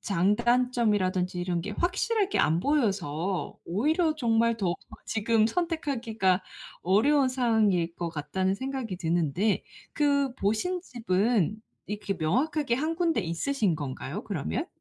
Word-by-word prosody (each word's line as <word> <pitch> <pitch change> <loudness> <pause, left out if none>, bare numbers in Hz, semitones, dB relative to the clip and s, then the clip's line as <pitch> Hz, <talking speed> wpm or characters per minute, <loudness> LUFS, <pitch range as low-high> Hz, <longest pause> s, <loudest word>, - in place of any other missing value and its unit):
장단점이라든지 205 -2 +1
이런 175 -1 -1
게 200 - -5
확실하게 390 - 0
안 160 +2 +2
보여서 195 - -1
오히려 310 - +1
정말 230 -3 +2
더욱 180 -5 -1 0.3
지금 220 0 +2
선택하기가 235 - 0 0.4
어려운 260 - +3
상황일 220 -9 +2
것 170 -1 -3
같다는 185 +6 -1
생각이 260 -6 -4
드는데 175 +4 0 0.3
그 280 -3 +1
보신 265 - 0
집은 215 - 0 0.3
이렇게 205 -1 -3
명확하게 250 - 0
1 315 +5 -1
군데 335 -7 +1
있으신 185 - 0
건가요 145 - -5
그러면? 155 - -3
215 Hz, 290 characters per minute, -28 LUFS, 180-265 Hz, 0.4 s, 어려운